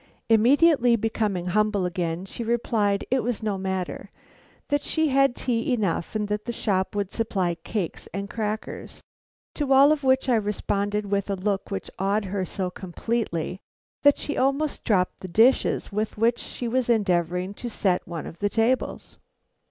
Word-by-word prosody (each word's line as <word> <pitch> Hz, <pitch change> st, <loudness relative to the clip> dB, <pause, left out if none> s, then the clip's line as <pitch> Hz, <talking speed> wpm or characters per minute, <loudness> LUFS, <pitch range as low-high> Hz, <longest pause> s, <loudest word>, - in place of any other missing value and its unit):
Immediately 245 Hz, +2 st, +5 dB
becoming 215 Hz, -5 st, -1 dB
humble 210 Hz, +1 st, +1 dB
again, 175 Hz, -1 st, -2 dB
she 235 Hz, -, -6 dB
replied 220 Hz, -3 st, 0 dB
it 260 Hz, -1 st, +3 dB
was 235 Hz, -2 st, -2 dB
no 210 Hz, -2 st, 0 dB
matter, 190 Hz, -1 st, -4 dB, 0.6 s
that 290 Hz, 0 st, +1 dB
she 315 Hz, -1 st, +1 dB
had 275 Hz, -2 st, +3 dB
tea 235 Hz, 0 st, -1 dB
enough 200 Hz, -5 st, -1 dB
and 210 Hz, -1 st, 0 dB
that 210 Hz, 0 st, -3 dB
the 240 Hz, -, -2 dB
shop 195 Hz, -4 st, -1 dB
would 200 Hz, -2 st, -2 dB
supply 195 Hz, -6 st, 0 dB
cakes 170 Hz, +2 st, -4 dB
and 200 Hz, +3 st, -4 dB
crackers; 215 Hz, +1 st, -5 dB, 0.5 s
to 290 Hz, -3 st, -2 dB
all 275 Hz, +2 st, +7 dB
of 305 Hz, -2 st, 0 dB
which 260 Hz, 0 st, +3 dB
I 245 Hz, -3 st, +4 dB
responded 205 Hz, 0 st, -1 dB
with 200 Hz, 0 st, 0 dB
a 200 Hz, -, 0 dB
look 195 Hz, +1 st, -2 dB
which 195 Hz, -, -5 dB
awed 200 Hz, +2 st, +1 dB
her 190 Hz, 0 st, -2 dB
so 185 Hz, -1 st, -3 dB
completely 185 Hz, -2 st, -3 dB, 0.4 s
that 285 Hz, 0 st, +5 dB
she 295 Hz, -, -3 dB
almost 275 Hz, +3 st, 0 dB
dropped 185 Hz, -5 st, +1 dB
the 185 Hz, -, -7 dB
dishes 225 Hz, +7 st, +3 dB
with 210 Hz, +2 st, -2 dB
which 230 Hz, +2 st, +2 dB
she 245 Hz, -, -5 dB
was 245 Hz, +1 st, 0 dB
endeavoring 180 Hz, -4 st, +1 dB
to 240 Hz, +4 st, -6 dB
set 190 Hz, -5 st, 0 dB
one 170 Hz, -2 st, -5 dB
of 165 Hz, -, -9 dB
the 205 Hz, -, +1 dB
tables. 230 Hz, +5 st, -1 dB
210 Hz, 165 wpm, -25 LUFS, 190-240 Hz, 0.6 s, all